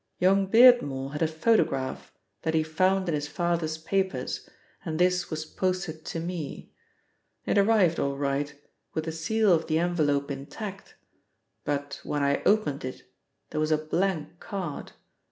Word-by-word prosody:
Young 195 +1 +3
Beardmore 195 - +5
had 150 - -4
a 160 - +4
photograph 160 - 0 0.3
that 160 0 -1
he 160 - +3
found 185 +4 +1
in 170 - 0
his 150 -1 -1
father's 165 0 -1
papers 190 +4 -2 0.3
and 160 -3 -3
this 180 0 +2
was 155 -1 -3
posted 185 -2 -2
to 165 - -4
me. 165 -3 -5 0.7
It - - +3
arrived 200 -5 +4
all 140 0 -1
right, 140 +1 -1 0.4
with 160 - -1
the 160 - -2
seal 195 +6 +2
of 165 -1 +1
the 155 - +1
envelope 150 -5 +1
intact, 195 +9 -7 0.7
but 145 -1 -3
when 145 -1 -1
I 140 0 +2
opened 205 -10 +2
it, 130 0 -6 0.5
there - - -2
was 155 - +1
a 155 - +4
blank 165 0 -2
card. 190 -9 -5
160 Hz, 155 wpm, -27 LUFS, 150-185 Hz, 0.7 s, Beardmore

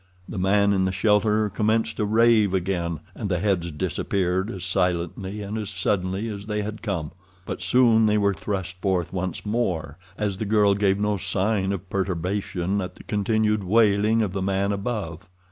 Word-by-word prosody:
The 100 - -5
man 100 +2 +3
in 95 -1 +2
the 95 - 0
shelter 105 +2 +2
commenced 110 +2 0
to 105 - 0
rave 110 -2 +4
again, 85 -3 -2
and 105 - -4
the 90 - +1
heads 90 -2 0
disappeared 90 +5 -1
as 95 -6 -6
silently 90 +3 -1
and 105 +2 -4
as 105 - -4
suddenly 95 +1 -1
as 100 -2 -6
they 105 -1 -1
had 105 +1 -6
come. 90 -9 -3 0.3
But - - -5
soon 115 -3 +4
they 105 0 +3
were 100 -1 +2
thrust 95 -2 -4
forth 95 -3 0
once 95 0 -3
more, 90 -9 -2 0.2
as 100 -3 -1
the 110 - -3
girl 105 -1 +4
gave 100 -1 +2
no 105 0 0
sign 95 +1 0
of 100 -1 -4
perturbation 95 0 -1
at 90 -1 -6
the - - -13
continued 105 0 +1
wailing 110 +2 +3
of 95 -3 -3
the 100 - -2
man 100 +1 0
above. 100 -4 -4
100 Hz, 180 wpm, -24 LUFS, 95-105 Hz, 0.3 s, rave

